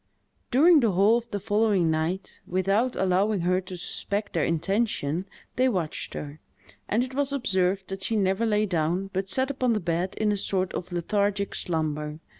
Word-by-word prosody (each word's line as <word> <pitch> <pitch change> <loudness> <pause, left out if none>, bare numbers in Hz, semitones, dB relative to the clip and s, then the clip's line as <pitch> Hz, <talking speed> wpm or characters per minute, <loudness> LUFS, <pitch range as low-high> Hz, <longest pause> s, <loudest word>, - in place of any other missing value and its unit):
During 310 +6 +6
the 230 -7 +2
whole 205 +6 +4
of 235 0 -15
the 205 - -3
following 205 -5 +2
night, 165 +5 -2
without 195 +7 +1
allowing 190 +2 +1
her 180 +2 +1
to 185 0 -8
suspect 200 +3 -4
their 165 - +1
intention, 175 -1 0 0.3
they 260 +1 +4
watched 180 -9 -3
her; 145 +1 -7 0.5
and 230 +4 +2
it 260 0 -6
was 280 +1 0
observed 190 -7 0
that 195 0 -5
she 205 +4 0
never 195 +2 +1
lay 210 0 +2
down, 180 +1 -1
but 190 +1 -2
sat 260 +4 +1
upon 255 -3 +1
the 215 - 0
bed 175 +1 -2
in 215 -1 +1
a 205 - 0
sort 190 -1 -1
of 180 0 -5
lethargic 200 +3 0
slumber. 155 -2 -2
195 Hz, 180 wpm, -26 LUFS, 175-220 Hz, 0.5 s, During